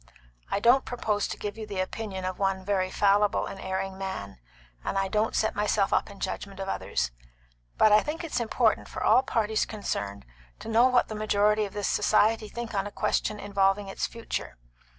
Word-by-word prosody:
I -, -, 0 dB
don't 245 Hz, +5 st, +5 dB
propose 210 Hz, -4 st, -1 dB
to -, -, -5 dB
give 205 Hz, +1 st, -5 dB
you 215 Hz, -, -6 dB
the 200 Hz, -2 st, -4 dB
opinion 190 Hz, 0 st, -3 dB
of 185 Hz, 0 st, -4 dB
one 195 Hz, -1 st, 0 dB
very 190 Hz, -2 st, +1 dB
fallible 205 Hz, +1 st, +3 dB
and 195 Hz, -, -7 dB
erring 190 Hz, 0 st, -3 dB
man, 190 Hz, -, -5 dB, 0.4 s
and -, -, -2 dB
I 195 Hz, 0 st, +1 dB
don't 215 Hz, +3 st, 0 dB
set 220 Hz, -, +1 dB
myself 205 Hz, -1 st, +1 dB
up -, -, +1 dB
in 200 Hz, -, -12 dB
judgment 195 Hz, +1 st, -4 dB
of 195 Hz, -, -4 dB
others; 60 Hz, -, -1 dB, 0.7 s
but 215 Hz, -, +6 dB
I 210 Hz, 0 st, +7 dB
think 320 Hz, +3 st, -4 dB
it's 300 Hz, -7 st, -2 dB
important 235 Hz, -2 st, +1 dB
for -, -, -5 dB
all -, -, +6 dB
parties 220 Hz, -4 st, 0 dB
concerned 100 Hz, -, -4 dB, 0.3 s
to -, -, -8 dB
know 230 Hz, +3 st, +5 dB
what 250 Hz, -1 st, +3 dB
the -, -, -6 dB
majority 210 Hz, 0 st, +2 dB
of 200 Hz, -, -9 dB
this 205 Hz, -1 st, -2 dB
society 215 Hz, +1 st, +2 dB
think 235 Hz, 0 st, -6 dB
on 195 Hz, 0 st, 0 dB
a -, -, -8 dB
question 210 Hz, +1 st, -1 dB
involving 195 Hz, 0 st, +1 dB
its -, -, -2 dB
future. 230 Hz, -1 st, -5 dB
205 Hz, 195 wpm, -27 LUFS, 195-220 Hz, 0.7 s, I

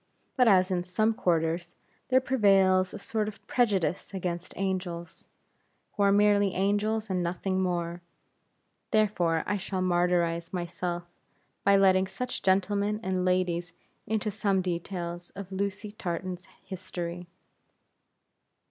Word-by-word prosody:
But 250 Hz, -2 st, +4 dB
as 185 Hz, -2 st, +5 dB
in 175 Hz, -1 st, 0 dB
some 215 Hz, +5 st, +1 dB
quarters, 170 Hz, -4 st, 0 dB, 0.3 s
there 260 Hz, 0 st, +5 dB
prevails 195 Hz, -7 st, +3 dB
a -, -, -6 dB
sort 215 Hz, +1 st, -2 dB
of 215 Hz, -, -8 dB
prejudice 195 Hz, -7 st, 0 dB
against 175 Hz, -1 st, -4 dB
angels, 180 Hz, -3 st, -4 dB, 0.7 s
who 205 Hz, -, -3 dB
are 200 Hz, 0 st, +5 dB
merely 205 Hz, -1 st, +4 dB
angels 205 Hz, +3 st, +1 dB
and 180 Hz, -1 st, 0 dB
nothing 185 Hz, +2 st, -1 dB
more; 175 Hz, -1 st, -2 dB, 0.9 s
therefore 175 Hz, -7 st, +2 dB
I 205 Hz, -, 0 dB
shall 190 Hz, -1 st, -3 dB
martyrize 175 Hz, -2 st, +1 dB
myself, 175 Hz, -1 st, -3 dB, 0.6 s
by 200 Hz, 0 st, +5 dB
letting 190 Hz, -1 st, +4 dB
such 250 Hz, +6 st, -4 dB
gentlemen 200 Hz, +2 st, +1 dB
and 185 Hz, -2 st, 0 dB
ladies 175 Hz, -2 st, 0 dB, 0.3 s
into 215 Hz, 0 st, -1 dB
some 200 Hz, -2 st, +1 dB
details 175 Hz, -1 st, -4 dB
of 195 Hz, -1 st, -8 dB
Lucy 200 Hz, +2 st, -3 dB
Tartan's 180 Hz, -2 st, -5 dB, 0.2 s
history. 175 Hz, -2 st, -6 dB
185 Hz, 120 wpm, -28 LUFS, 175-205 Hz, 0.9 s, as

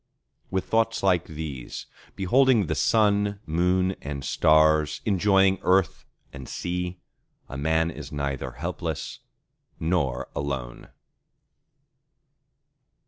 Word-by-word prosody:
With 95 Hz, -1 st, -1 dB
thoughts 115 Hz, 0 st, +1 dB
like 90 Hz, -3 st, +3 dB
these, 75 Hz, -6 st, -7 dB, 0.3 s
beholding 120 Hz, +3 st, +3 dB
the -, -, -1 dB
Sun, 105 Hz, -2 st, +2 dB
Moon, 90 Hz, +3 st, +1 dB
and 70 Hz, -1 st, -5 dB
Stars, 80 Hz, -1 st, +3 dB
enjoying 95 Hz, -1 st, +3 dB
earth 95 Hz, -1 st, +1 dB, 0.3 s
and 65 Hz, -3 st, -9 dB
sea, 90 Hz, 0 st, -4 dB, 0.5 s
a -, -, -8 dB
man 80 Hz, +3 st, +1 dB
is 75 Hz, -2 st, -9 dB
neither 70 Hz, -3 st, -3 dB
helpless 85 Hz, +2 st, -4 dB, 0.6 s
nor 80 Hz, -7 st, 0 dB
alone! 65 Hz, -4 st, -4 dB
85 Hz, 95 wpm, -25 LUFS, 75-95 Hz, 0.6 s, like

